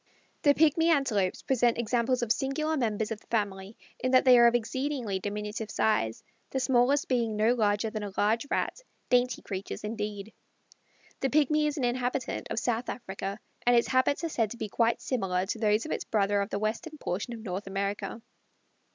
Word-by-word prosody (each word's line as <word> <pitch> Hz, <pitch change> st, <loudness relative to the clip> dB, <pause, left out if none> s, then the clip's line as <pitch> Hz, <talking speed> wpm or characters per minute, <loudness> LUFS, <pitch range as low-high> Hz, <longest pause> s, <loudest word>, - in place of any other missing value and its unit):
The 285 Hz, -1 st, +5 dB
Pigmy 320 Hz, +1 st, +4 dB
Antelopes 240 Hz, -, +1 dB
present 245 Hz, -3 st, +2 dB
examples 240 Hz, +2 st, +1 dB
of 225 Hz, -, -1 dB
singular 275 Hz, +6 st, 0 dB
members 220 Hz, -5 st, -1 dB
of 215 Hz, -, -4 dB
the -, -, -25 dB
family, 200 Hz, -2 st, -2 dB, 0.2 s
in 255 Hz, -, 0 dB
that 255 Hz, -, +6 dB
they 255 Hz, -1 st, +8 dB
are 235 Hz, -, +8 dB
of 235 Hz, -, +3 dB
exceedingly 240 Hz, -3 st, -2 dB
diminutive 210 Hz, +2 st, -4 dB
size, 115 Hz, -, 0 dB, 0.3 s
the 265 Hz, -, -2 dB
smallest 260 Hz, +2 st, +2 dB
being 235 Hz, -4 st, 0 dB
no 220 Hz, +3 st, +3 dB
larger 215 Hz, -1 st, +1 dB
than 215 Hz, -, -4 dB
a 205 Hz, -1 st, -5 dB
large 225 Hz, +6 st, +1 dB
Rat, -, -, -1 dB, 0.3 s
dainty 250 Hz, -1 st, +2 dB
creatures 195 Hz, +1 st, -5 dB
indeed. 210 Hz, -1 st, -4 dB, 0.9 s
The 270 Hz, -, 0 dB
Pigmy 300 Hz, +1 st, +3 dB
is 295 Hz, -, -2 dB
an 270 Hz, -, -2 dB
inhabitant 250 Hz, +1 st, -1 dB
of -, -, -3 dB
South 240 Hz, 0 st, -1 dB
Africa, 195 Hz, -3 st, -5 dB, 0.2 s
and 245 Hz, 0 st, +4 dB
its 235 Hz, -, +3 dB
habits 260 Hz, +4 st, +2 dB
are 330 Hz, -, -1 dB
said 225 Hz, -8 st, 0 dB
to 235 Hz, -, -8 dB
be 220 Hz, -2 st, -4 dB
quite 230 Hz, +2 st, +1 dB
similar 190 Hz, -7 st, -1 dB
to 220 Hz, +3 st, -4 dB
those 215 Hz, 0 st, +2 dB
of 315 Hz, -, -5 dB
its -, -, -2 dB
brother 205 Hz, -1 st, +1 dB
of 200 Hz, -, -3 dB
the -, -, -2 dB
western 225 Hz, +9 st, -3 dB
portion 205 Hz, +1 st, -3 dB
of 225 Hz, -, -9 dB
North 195 Hz, -1 st, -5 dB
America. 200 Hz, +3 st, -3 dB
230 Hz, 190 wpm, -29 LUFS, 210-255 Hz, 0.9 s, they